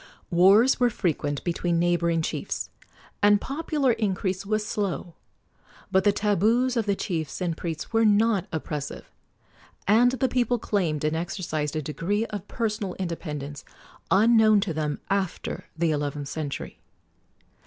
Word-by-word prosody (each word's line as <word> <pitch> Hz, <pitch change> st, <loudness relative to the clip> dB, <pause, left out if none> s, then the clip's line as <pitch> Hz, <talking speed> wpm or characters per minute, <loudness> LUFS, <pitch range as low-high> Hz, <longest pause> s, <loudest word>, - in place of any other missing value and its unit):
Wars 195 Hz, +10 st, +5 dB
were 245 Hz, -1 st, +4 dB
frequent 145 Hz, -8 st, -2 dB
between 175 Hz, 0 st, 0 dB
neighboring 170 Hz, -1 st, +1 dB
chiefs, -, -, -3 dB, 0.5 s
and 205 Hz, 0 st, +5 dB
popular 290 Hz, -1 st, 0 dB
increase 195 Hz, -3 st, -1 dB
was 215 Hz, 0 st, 0 dB
slow; 195 Hz, -5 st, -3 dB, 0.8 s
but 190 Hz, 0 st, +3 dB
the 205 Hz, -, +5 dB
tabus 220 Hz, +6 st, +2 dB
of 225 Hz, -3 st, 0 dB
the 200 Hz, -, +2 dB
chiefs 165 Hz, -8 st, -3 dB
and 175 Hz, -3 st, -1 dB
priests 165 Hz, +3 st, -5 dB
were 225 Hz, 0 st, +4 dB
not 210 Hz, -2 st, +3 dB
oppressive, 150 Hz, -2 st, -5 dB, 0.8 s
and 240 Hz, +5 st, +5 dB
the 260 Hz, +1 st, +1 dB
people 245 Hz, -1 st, +1 dB
claimed 175 Hz, -10 st, -1 dB
and 155 Hz, +1 st, +1 dB
exercised 155 Hz, -2 st, -3 dB
a 155 Hz, -, -2 dB
degree 190 Hz, +9 st, -1 dB
of 205 Hz, -3 st, -7 dB
personal 210 Hz, -5 st, -2 dB
independence 150 Hz, -5 st, -5 dB, 0.5 s
unknown 220 Hz, +1 st, +5 dB
to 195 Hz, -4 st, -2 dB
them 150 Hz, -2 st, -2 dB
after 195 Hz, -3 st, -2 dB
the 165 Hz, -1 st, +2 dB
eleventh 145 Hz, -1 st, -2 dB
century. 150 Hz, -3 st, -5 dB
190 Hz, 135 wpm, -26 LUFS, 160-215 Hz, 0.8 s, Wars